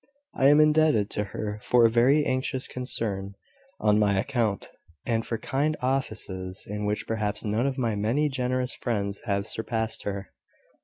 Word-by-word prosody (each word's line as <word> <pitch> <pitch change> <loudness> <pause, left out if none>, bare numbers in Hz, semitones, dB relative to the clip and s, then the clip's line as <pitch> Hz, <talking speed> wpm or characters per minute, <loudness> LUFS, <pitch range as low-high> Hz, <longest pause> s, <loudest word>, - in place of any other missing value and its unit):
"I 135 - +3
am 145 +1 +6
indebted 150 -9 +4
to 105 - -1
her 105 +1 -5
for 120 +1 +4
a - - +6
very 135 +6 +4
anxious 130 0 -1
concern 100 -6 -3 0.4
on 105 0 +3
my 100 -2 +3
account, 110 -3 -1 0.3
and 115 -1 0
for 115 - -3
kind 145 +5 -1
offices 105 -8 -3
in 105 +1 -4
which 105 +1 -1
perhaps 105 -2 -2
none 110 +5 +1
of 135 -1 -2
my 115 -4 0
many 115 +9 +1
generous 130 -2 -1
friends 100 -4 -2
have 100 -2 0
surpassed 110 0 -2
her." 100 -1 -5
115 Hz, 160 wpm, -27 LUFS, 105-130 Hz, 0.4 s, am